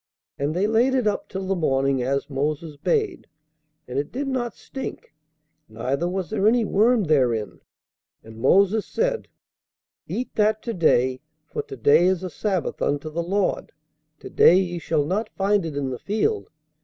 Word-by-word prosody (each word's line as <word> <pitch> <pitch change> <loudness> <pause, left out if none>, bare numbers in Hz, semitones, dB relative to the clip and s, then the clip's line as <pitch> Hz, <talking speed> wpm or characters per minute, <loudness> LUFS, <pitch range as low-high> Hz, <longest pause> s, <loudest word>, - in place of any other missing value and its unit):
And 145 +3 -1
they 190 +3 +2
laid 235 +5 +3
it 255 -3 +1
up 210 - -1
till 190 0 -4
the 195 +1 0
morning, 135 -5 +1
as 135 +2 -1
Moses 150 +2 -3
bade; 420 - -1 0.6
and 125 +2 -2
it 145 - -4
did 275 +3 -3
not 245 -5 -2
stink, 270 - -8 0.6
neither 130 +10 -2
was 185 0 -3
there 210 -1 +2
any 230 0 +3
worm 220 +3 +3
therein. 125 - +1 0.6
And 110 0 -12
Moses 200 - +4
said, - - -1 0.8
Eat 250 - -4
that 215 0 +1
to 230 - -3
day; 130 - +2 0.2
for - - -4
to 135 - -10
day 145 +8 +5
is 185 -1 +1
a 185 - -4
sabbath 185 -1 -2
unto 145 +2 -1
the 170 +2 -2
Lord: 195 +3 -1 0.5
to - - -9
day 180 - +6
ye 175 -2 -1
shall 155 -3 0
not 210 +7 -1
find 195 -2 +2
it 145 -3 -6
in 135 -2 -2
the 125 - -5
field. 220 - -1
180 Hz, 170 wpm, -23 LUFS, 140-215 Hz, 0.8 s, day